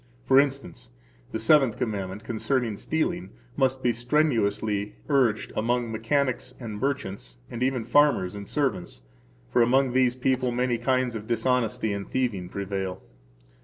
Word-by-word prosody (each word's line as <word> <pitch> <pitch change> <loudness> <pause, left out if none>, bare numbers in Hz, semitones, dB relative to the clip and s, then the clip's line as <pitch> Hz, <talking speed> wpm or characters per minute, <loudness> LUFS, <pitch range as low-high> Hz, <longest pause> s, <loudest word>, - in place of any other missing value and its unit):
For 135 0 +6
instance, 135 - -2 0.4
the - - -2
Seventh 130 +1 +4
Commandment, 100 -2 -3
concerning 120 0 -1
stealing, 155 - -2 0.3
must 130 0 +1
be 120 - +3
strenuously 110 -6 0
urged 125 -7 +2
among 120 +1 0
mechanics 130 +3 -1
and 110 -4 -6
merchants, 100 - -3
and 120 - -6
even 130 -3 0
farmers 120 -8 +3
and 100 -1 -8
servants, 130 - -2 0.5
for - - +4
among 130 +2 +3
these 125 -1 +3
people 130 -1 +1
many 120 -1 0
kinds 130 -1 +1
of 110 -1 -6
dishonesty 115 -2 0
and 100 -1 -5
thieving 105 -9 -1
prevail. 95 -1 -4
120 Hz, 135 wpm, -26 LUFS, 105-130 Hz, 0.5 s, For